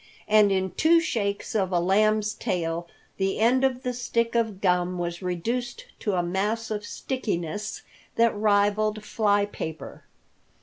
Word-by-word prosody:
And 210 -1 +5
in 190 -1 0
two 330 +2 +4
shakes 205 -11 -2
of 195 -4 0
a 175 - +2
lamb's 215 +4 +2
tail 170 -4 -2 0.3
the 195 0 0
end 245 +4 +3
of 260 -1 +1
the 250 -1 -1
stick 235 -1 -1
of 225 -4 0
gum 180 -1 +1
was 175 0 -3
reduced 230 +8 -3
to 205 - -1
a 180 -1 +1
mass 210 +6 -1
of 210 -1 -2
stickiness 210 -5 -4 0.3
that 230 -1 +3
rivaled 210 +1 +2
fly 205 -2 +2
paper. 160 -6 -7
210 Hz, 145 wpm, -26 LUFS, 185-230 Hz, 0.3 s, And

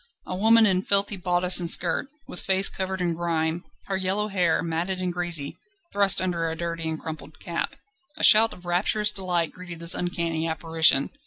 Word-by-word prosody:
A 185 - -6
woman 225 +3 +5
in 185 -3 +1
filthy 200 +1 +1
bodice 180 0 +1
and 170 -2 0
skirt, - - +3 0.2
with 180 - -7
face 190 0 +2
covered 190 -1 -5
in 175 -1 -1
grime, 165 0 -3 0.2
her 195 - -4
yellow 190 +3 -1
hair, 180 -5 0
matted 170 +3 -3
and 180 -1 -3
greasy, 170 -5 +1 0.4
thrust 200 -1 +3
under 170 -3 -2
a 160 - -5
dirty 165 -1 -5
and 160 -1 -5
crumpled 155 -1 -10
cap. 170 -1 -5 0.4
A - - -6
shout 225 +1 +7
of 180 - -14
rapturous 205 +4 0
delight 180 -4 -2
greeted 180 -2 -11
this 170 0 +5
uncanny 170 -2 -3
apparition. 160 -3 +2
175 Hz, 180 wpm, -24 LUFS, 165-190 Hz, 0.4 s, shout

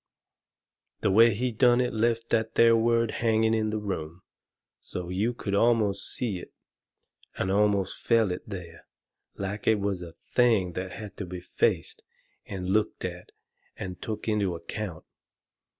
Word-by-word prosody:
The 100 - +2
way 115 +2 +6
he 125 +3 -1
done 120 +2 +4
it 125 -1 0
left 115 +1 0
that 110 -1 +1
there 115 0 +6
word 115 0 +2
hanging 110 -1 +2
in 110 -1 +1
the 110 - -1
room, 90 -5 -5 0.6
so 90 -1 -6
you 100 +6 0
could 105 -4 -5
almost 105 -2 +2
see 105 -7 -2
it - - -11 0.9
and 95 - -1
almost 100 -1 +1
feel 115 -4 +4
it 90 - -3
there, 90 -4 -8 0.5
like 100 +1 -5
it 110 -2 +4
was 100 -2 -1
a 85 - -7
thing 95 +1 +1
that 90 +1 -4
had 105 -4 -9
to 100 - -4
be 90 0 -6
faced 90 - -1 0.5
and 95 -1 -4
looked 105 -1 0
at 90 -1 -7 0.5
and 90 -1 -6
took 110 0 -5
into 100 -5 +1
account. 85 +1 -6
105 Hz, 155 wpm, -27 LUFS, 95-115 Hz, 0.9 s, way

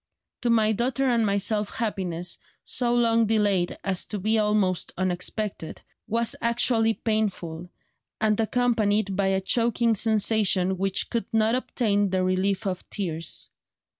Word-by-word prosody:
To 245 - 0
my 220 -2 +3
daughter 250 +5 0
and 235 -4 +2
myself 200 +1 0
happiness, 180 -6 -3 0.2
so 245 -1 0
long 230 -2 +3
delayed 205 -5 +1
as 190 -2 0
to 210 - -5
be 215 +3 +1
almost 210 -4 0
unexpected, 185 0 -3 0.3
was 230 +1 +1
actually 235 -1 +2
painful, 180 -7 -2 0.5
and 215 -1 +1
accompanied 220 -4 +1
by 195 0 +1
a 190 0 +1
choking 235 +2 +1
sensation 205 -4 +2
which 195 0 0
could 235 - -2
not 220 0 +2
obtain 210 -5 0
the 185 0 0
relief 185 +2 0
of 185 -2 -4
tears. 165 -5 -3
210 Hz, 135 wpm, -25 LUFS, 190-230 Hz, 0.5 s, my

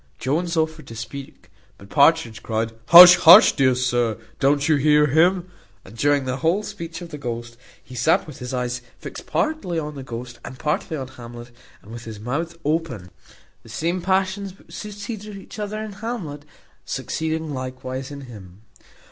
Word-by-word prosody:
Jones 165 +6 -1
offered 160 -3 -1
to 115 - -9
speak, 135 +2 -9 0.3
but 100 +1 -16
Partridge 140 -6 +3
cried 115 0 -2 0.2
"Hush, 180 +1 +11
hush! 180 +7 +9
dear 130 -2 +3
sir, 120 -3 0 0.2
don't 140 +2 +2
you 155 -2 +4
hear 150 +1 +4
him?" 175 +5 +2 0.3
And 100 - -13
during 145 +2 +1
the 130 0 -2
whole 165 +8 +1
speech 175 -5 -7
of 170 - -9
the 150 - -8
ghost, 120 -3 -6 0.3
he 130 - -14
sat 125 +6 +2
with 150 -4 -11
his 125 +1 -6
eyes 125 -1 -3 0.2
fixed - - -9
partly 310 - -1
on 150 -1 -3
the 140 - -8
ghost 120 -1 -8
and 130 - -9
partly 150 +3 -2
on 135 -2 -5
Hamlet, 120 -2 -11 0.3
and 105 - -14
with 120 0 -9
his 110 -2 -8
mouth 160 +9 -4
open; 140 - -2 0.5
the - - -17
same 170 +10 -2
passions 190 +1 -1
which - - -19
succeeded 210 0 -7
each 195 - -11
other 210 +1 -4
in 215 -1 -6
Hamlet, 195 -9 -6 0.4
succeeding 160 -1 -3
likewise 130 0 -6
in 140 -1 -8
him. 105 -6 -13
145 Hz, 175 wpm, -22 LUFS, 125-170 Hz, 0.5 s, Hush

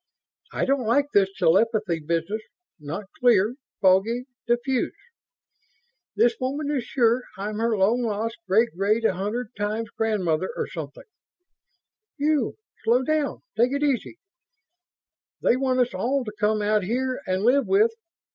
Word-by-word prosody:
I - - -1
don't 270 -4 0
like 285 +5 +2
this 195 -1 +4
telepathy 195 0 +2
business... 165 +7 -2 0.4
not 150 +7 -6
clear... 230 -3 +4 0.3
foggy, 200 +6 +3 0.2
diffuse... 240 +2 0 1.2
this 235 -1 +3
woman 280 +3 -2
is 265 -5 -1
sure 240 -1 +2 0.2
I'm 210 +2 -4
her 225 -1 +1
long 215 +6 +3
lost 225 0 -2
great 220 +5 +4
great 210 +5 +1
a - - +3
hundred 210 +6 -4
times 215 +2 -3
grandmother 185 -6 0
or - - -1
something - - -8 1.1
You! 290 -4 +1 0.3
Slow 245 +3 +3
down. 305 0 -1
Take 245 +4 +2
it 280 +1 -1
easy! 285 +3 -1 1.3
They - - +4
want 255 -1 +1
us 245 - 0
all 250 +8 0
to 210 - -5
come 210 0 +1
out 210 0 +2
here 255 +4 -1
and 185 +1 0
live 265 +4 +3
with 425 +4 +4
230 Hz, 140 wpm, -25 LUFS, 205-255 Hz, 1.3 s, this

